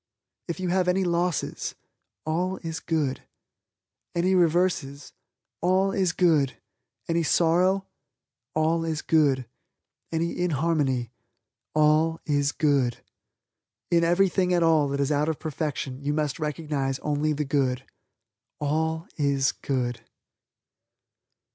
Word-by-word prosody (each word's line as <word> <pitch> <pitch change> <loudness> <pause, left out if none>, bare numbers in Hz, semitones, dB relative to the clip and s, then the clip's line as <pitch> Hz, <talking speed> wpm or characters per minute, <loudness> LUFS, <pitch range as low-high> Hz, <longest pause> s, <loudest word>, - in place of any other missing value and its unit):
If 170 +1 -4
you 185 -1 -2
have 180 0 +1
any 185 +1 +2
losses, 175 -1 -1 0.5
All 180 +4 -1
is 165 0 -4
Good, 155 -5 -1 0.9
any 180 +2 +2
reverses, 170 -5 +1 0.5
All 185 +2 +2
is 190 -3 +1
Good, 155 -7 +2 0.5
any 170 0 +1
sorrow, 180 +4 +2 0.7
All 160 +1 +2
is 160 -1 -2
Good, 140 -5 +3 0.7
any 165 +1 -1
inharmony, 145 -7 0 0.6
All 155 +2 +3
is 145 -2 +1
Good. 140 -6 +1 0.9
In 170 -1 +4
everything 180 +1 +3
at 175 - +3
all 160 -3 +4
that 140 0 -2
is 140 +1 +1
out 150 +1 +1
of 160 - -1
perfection 145 -3 -4
you 145 +1 0
must 150 -1 -1
recognize 150 -3 -2
only 150 +1 +1
the 150 0 -1
good. 135 -2 0 0.8
ALL 160 +2 -1
IS 140 -2 +2
GOOD. 125 -3 -2
155 Hz, 115 wpm, -26 LUFS, 145-170 Hz, 0.9 s, In